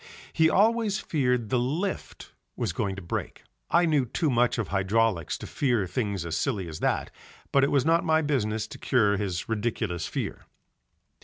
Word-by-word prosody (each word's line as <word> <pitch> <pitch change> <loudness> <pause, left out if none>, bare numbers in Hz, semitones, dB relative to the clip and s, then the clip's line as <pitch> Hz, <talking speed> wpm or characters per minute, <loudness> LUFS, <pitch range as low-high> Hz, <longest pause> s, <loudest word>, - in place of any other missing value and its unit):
He 160 0 +4
always 215 +1 +3
feared 125 -7 0
the 125 - +2
lift 160 +11 -3 0.2
was - - -2
going 95 -1 -2
to 95 - -8
break. 85 - -4 0.3
I 175 +1 +4
knew 150 -6 +2
too 155 +5 0
much 120 0 +2
of 115 - -2
hydraulics 95 -3 +1
to - - -8
fear 120 -8 0
things 100 -1 -2
as 80 -1 -3
silly 100 -1 -1
as 80 -1 -7
that, - - 0 0.4
but 140 - +4
it 140 - +3
was 140 -2 +2
not 165 +1 +3
my 160 0 +2
business 110 -7 0
to - - -10
cure 105 -6 +2
his 95 -4 -3
ridiculous 105 -6 -2
fear. - - -5
120 Hz, 175 wpm, -27 LUFS, 100-150 Hz, 0.4 s, He